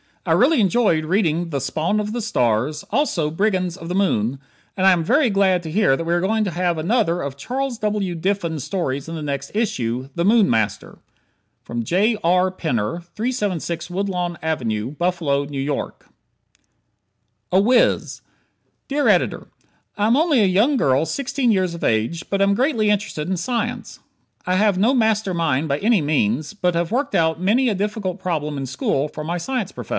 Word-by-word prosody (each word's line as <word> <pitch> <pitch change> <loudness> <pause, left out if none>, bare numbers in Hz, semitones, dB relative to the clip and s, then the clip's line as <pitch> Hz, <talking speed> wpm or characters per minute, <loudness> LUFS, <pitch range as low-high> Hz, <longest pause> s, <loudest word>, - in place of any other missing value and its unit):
I - - +1
really 310 -7 +4
enjoyed 195 -6 +2
reading 170 -2 0
the 140 -3 -2
"Spawn 155 +10 -1
of 210 0 -3
the 240 - -2
Stars," 130 - 0
also 200 - 0
"Brigands 185 -1 0
of 165 -3 -9
the 180 - -2
Moon," 135 - +1 0.4
and 190 - +1
I 190 - +7
am 175 -3 +2
very 250 - +3
glad 190 -3 +2
to 160 - -6
hear 195 -6 +3
that - - -3
we 170 +1 -1
are 175 - +1
going 215 +4 +1
to 195 - -2
have 175 0 0
another 175 0 +1
of 140 -1 -5
Charles 250 - -3
W. 210 -4 -1
Diffin's 170 -4 -2
stories 140 -7 -3
in 165 - -5
the 155 - -5
next 140 -1 -3
issue 130 - -1
"The 170 - -1
Moon 215 -1 +5
Master." 110 -3 -1 0.8
J. 205 - +1
R. 180 +2 +3
Penner, 155 - -2
376 205 -9 -2
Woodlawn 180 -2 -2
Ave, 120 -10 -1
Buffalo 160 -3 0
N. 140 -1 -4
Y. 145 - -2 1.6
"A 185 - +4
Wiz" 235 +4 +2 0.7
Dear 285 +1 0
Editor: - - +1 0.5
I 205 - +1
am 230 +4 +3
only 305 -6 +3
a - - +4
young 210 +10 +3
girl 135 - +2
sixteen 255 - 0
years 185 -4 +1
of 170 - -7
age 115 +10 0
but 195 0 0
am 200 0 +3
greatly 230 -4 +2
interested 200 -7 -2
in 190 0 -1
science. 240 +4 -3 0.5
I 180 - +1
have 205 -1 +3
no 220 +7 +3
master 220 -5 +1
mind 160 -3 0
by 140 0 -1
any 215 -3 +3
means, 145 - 0
but 180 -4 0
have 170 +2 -1
worked 275 +4 -1
out 160 0 +1
many 235 +7 +3
a 210 - 0
difficult 200 -1 -3
problem 155 -5 -2
in 135 - -3
school 135 +2 -1
for 150 0 -7
my 170 +3 -3
science 230 +1 -3
prof. - - -9
180 Hz, 180 wpm, -21 LUFS, 155-215 Hz, 1.6 s, I